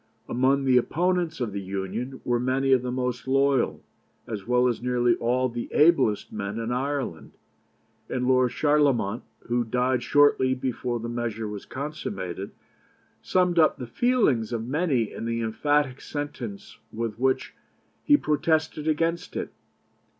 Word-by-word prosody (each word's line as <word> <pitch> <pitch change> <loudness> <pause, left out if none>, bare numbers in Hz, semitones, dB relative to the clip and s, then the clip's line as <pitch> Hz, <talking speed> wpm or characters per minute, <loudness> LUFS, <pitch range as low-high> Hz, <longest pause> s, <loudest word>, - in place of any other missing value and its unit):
Among 135 +3 +2
the 130 -1 +5
opponents 175 +4 0
of 120 -4 -2
the 100 - -3
Union 100 +7 -4
were 120 -1 +1
many 130 +2 +1
of 130 -2 +5
the 125 0 -3
most 125 0 -3
loyal, 135 -1 +2 0.4
as 105 -3 -6
well 125 0 +3
as 120 -2 -1
nearly 120 -1 +2
all 125 +2 +1
the 120 -1 -5
ablest 140 -10 +3
men 100 0 -4
in 115 +1 -3
Ireland; 130 - -3 0.8
and 125 0 -1
Lord 130 -1 +4
Charlemont, 140 -7 +2 0.2
who 120 0 0
died 125 +2 0
shortly 130 0 +4
before 125 -2 -2
the 115 - -5
measure 115 -2 -3
was 105 -1 -7
consummated, 100 - -5 0.7
summed 180 -2 +2
up 155 - +4
the 125 - -6
feelings 135 - +1
of 115 -1 -2
many 135 - 0
in - - -6
the 115 0 -1
emphatic 135 +4 0
sentence 135 -8 -6
with 115 -1 -4
which 130 +1 0 0.5
he 290 - +5
protested 155 - 0
against 165 +3 -1
it. - - -4
125 Hz, 145 wpm, -26 LUFS, 115-145 Hz, 0.8 s, the